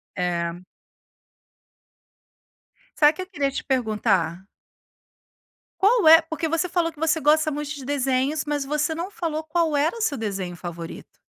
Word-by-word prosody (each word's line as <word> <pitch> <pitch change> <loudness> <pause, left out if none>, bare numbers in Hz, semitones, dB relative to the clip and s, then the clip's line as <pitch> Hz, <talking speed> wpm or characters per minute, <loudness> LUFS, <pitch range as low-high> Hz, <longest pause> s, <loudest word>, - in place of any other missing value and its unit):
Eh. 175 -1 -2 2.4
Sabe 300 0 +6
que 370 - -7
eu 370 - -7
queria 285 -7 -1
te - - -4
perguntar? 210 - 0 1.3
Qual 405 -3 +4
é 325 +1 +9
porque 320 0 -4
você 330 +3 0
falou 340 -1 0
que 305 - -20
você 320 0 +1
gosta 310 +1 +3
muito 295 0 -4
de 270 - -9
desenhos, 270 +1 0
mas 295 -2 -2
você 300 +2 -1
não 345 +4 -5
falou 320 -5 -3
qual 315 -1 0
era 305 +8 +1
o 460 - -6
seu 295 -10 0
desenho 195 -5 -4
favorito. 170 -1 -8
295 Hz, 150 wpm, -24 LUFS, 220-325 Hz, 2.4 s, é